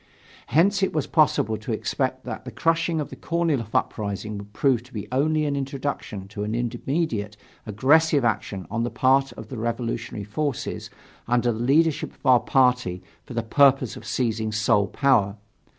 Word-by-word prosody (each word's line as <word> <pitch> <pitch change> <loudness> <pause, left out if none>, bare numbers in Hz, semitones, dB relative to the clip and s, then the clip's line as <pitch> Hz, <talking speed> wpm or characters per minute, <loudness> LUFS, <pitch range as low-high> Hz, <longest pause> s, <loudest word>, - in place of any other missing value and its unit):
Hence 195 - +3
it 190 - +1
was 155 -3 0
possible 130 -8 +2
to 110 +3 -6
expect 130 +4 -2
that - - -6
the - - -7
crushing 165 0 +1
of 150 - -4
the - - -7
Korniloff 160 -10 -1
uprising 105 0 -2
would 100 0 -11
prove 130 +1 +2
to 125 - -19
be 105 -3 -5
only 155 +4 +1
an 145 -1 -1
introduction 135 -8 -4
to 105 0 -5
an 105 +2 -2
immediate 120 -3 -2 0.3
aggressive 140 +6 +3
action 100 -4 -1
on 115 +1 -1
the 120 - -1
part 135 +2 +2
of 110 0 -10
the 125 - -6
revolutionary 115 -2 -3
forces 140 +6 -3 0.4
under 120 0 +2
the 110 - -4
leadership 150 +6 +2
of - - -25
our 130 -2 +6
party 125 -7 +1 0.2
for 125 - -8
the 115 - 0
purpose 135 +1 +3
of - - -10
seizing 110 -3 -1
sole 105 -1 +2
power. 110 -6 +2
125 Hz, 170 wpm, -24 LUFS, 110-140 Hz, 0.4 s, our